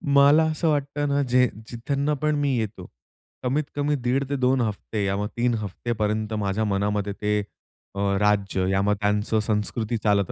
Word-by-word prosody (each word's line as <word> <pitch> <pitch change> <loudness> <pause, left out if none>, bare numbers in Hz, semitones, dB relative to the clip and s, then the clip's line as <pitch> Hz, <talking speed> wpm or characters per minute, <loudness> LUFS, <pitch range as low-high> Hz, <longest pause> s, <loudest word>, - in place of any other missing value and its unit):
मला 140 +3 +6
असं 160 +1 0
वाटतं 145 0 -1
ना 140 0 +2
जे, 125 +1 +5 0.2
जिथून 140 +5 -1
पण 150 0 +2
मी 145 -1 +1
येतो. 105 -5 -4 0.5
कमीत-कमी 145 +2 0
दीड 130 +3 +1
ते 140 - 0
2 130 0 +2
हफ्ते 105 -1 -2
या 95 - 0
मग 105 +1 -1
3 120 0 +2
हफ्त्यापर्यंत 110 +1 -2
माझ्या 100 +2 0
मनामध्ये 100 0 -1
ते 105 +1 0 0.6
अ, 100 - -4 0.2
राज्य 100 -2 +1
या 95 0 +2
मग 105 +1 +2
त्यांचं 105 +1 +1
संस्कृती 110 +2 -1
चालत 100 -3 +2
110 Hz, 165 wpm, -24 LUFS, 105-140 Hz, 0.6 s, मला